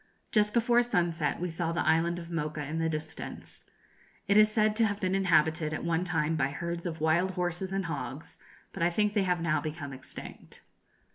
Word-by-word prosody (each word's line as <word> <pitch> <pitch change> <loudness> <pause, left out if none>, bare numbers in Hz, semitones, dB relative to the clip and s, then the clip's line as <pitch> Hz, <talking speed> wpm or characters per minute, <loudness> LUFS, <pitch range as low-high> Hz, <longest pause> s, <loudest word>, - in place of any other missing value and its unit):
Just 210 -1 +3
before 240 +1 +4
sunset 175 -9 0
we 180 0 -2
saw 165 0 -2
the 170 - -1
island 165 +2 +3
of 170 0 -8
Mocha 150 -2 -2
in 160 +3 -3
the 165 0 +1
distance. 155 0 -6 0.6
It 200 - +3
is 215 0 +7
said 215 -1 +2
to 225 -1 +4
have 205 -1 -3
been 185 -2 0
inhabited 160 -4 +2
at - - -4
one 170 +1 0
time 165 -2 0
by 140 -4 +2
herds 170 +4 -4
of 160 -2 -5
wild 170 +4 +2
horses 180 +1 -1
and 195 -1 -1
hogs, 140 -2 -5 0.4
but - - -6
I 170 - +4
think 210 +4 +1
they 205 - +2
have 180 -2 +1
now 165 -2 +1
become 150 -3 -5
extinct. 130 0 -10
170 Hz, 200 wpm, -29 LUFS, 160-190 Hz, 0.6 s, is